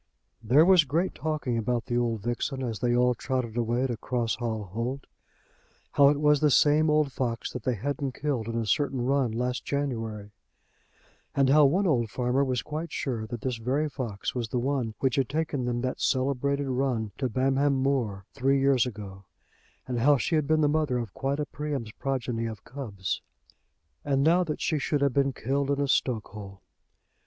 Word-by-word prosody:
There 130 +8 +5
was 185 -3 +6
great 160 +6 0
talking 150 -7 -2
about 120 +1 -1
the 120 -3 -2
old 115 -3 0
vixen 125 +3 -2
as 115 -4 -3
they 120 -1 +1
all 125 0 +4
trotted 125 -1 -3
away 120 +2 0
to 125 -3 -1
Cross 120 0 -1
Hall 115 -3 -3
Holt; 115 +8 -4 0.9
how 140 -1 +6
it 145 0 +1
was 150 -1 +4
the 150 - +3
same 150 +3 +4
old 150 -2 +2
fox 120 -3 -3
that 125 - -5
they 125 +2 0
hadn't 140 +4 -3
killed 135 -7 -2
in 115 0 -2
a 115 - -1
certain 135 +2 0
run 135 -3 +1
last 125 +2 -2
January, 115 -7 -3 1.0
and 135 -1 +3
how 150 0 +7
one 180 +9 +2
old 120 - +2
farmer 125 +6 +1
was 130 -2 -1
quite 155 +2 -5
sure 115 -5 -3
that 120 -1 -6
this 125 -3 -2
very 130 +7 0
fox 120 -9 -4
was 120 -3 -3
the 125 - -2
one 125 -3 -1
which 130 -1 +1
had 135 -4 +1
taken 150 -4 -1
them 120 0 -1
that 130 0 -3
celebrated 140 +1 0
run 125 -5 -1
to 130 -2 0
Bamham 135 +3 +2
Moor 130 -8 -1
three 135 +2 +2
years 135 -2 +3
ago, 100 -4 -8 0.6
and 125 -2 -2
how 140 +4 +5
she 130 - -2
had 155 -3 +2
been 155 0 +3
the 150 - +4
mother 150 -4 +1
of 115 -5 -4
quite 140 +1 -2
a 150 - 0
Priam's 145 -7 -4
progeny 120 -3 -2
of 110 -3 -7
cubs. 105 -9 -4 0.8
And 140 -1 +1
now 170 +4 +4
that 150 -2 -4
she 155 - 0
should 145 +1 0
have 140 -2 +2
been 140 0 +2
killed 135 +3 -1
in 140 0 +1
a 140 - +1
stokehole! 105 -6 -2
130 Hz, 190 wpm, -27 LUFS, 115-140 Hz, 1.0 s, how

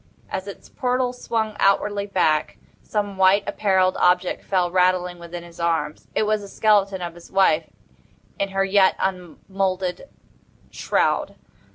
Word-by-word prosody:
As 190 - -4
its 200 - -10
portals 250 -1 -2
swung 220 -2 -2
outwardly 200 +1 +2
back, 160 -6 +1 0.2
some 205 -2 -3
white 190 +2 +4
apparelled 190 -2 +1
object 180 0 +2
fell 180 -3 0
rattling 180 -1 +1
within 170 0 -8
his 170 0 -14
arms. 165 -3 -1
It - - +2
was 215 0 0
the 200 - -9
skeleton 200 -2 +2
of 170 -1 -5
his 175 0 -15
wife 170 -5 +2 0.7
in 200 - 0
her 195 0 0
yet 195 -1 +4
unmoulded 185 - -3 0.6
shroud. - - 0
190 Hz, 140 wpm, -22 LUFS, 180-200 Hz, 0.7 s, white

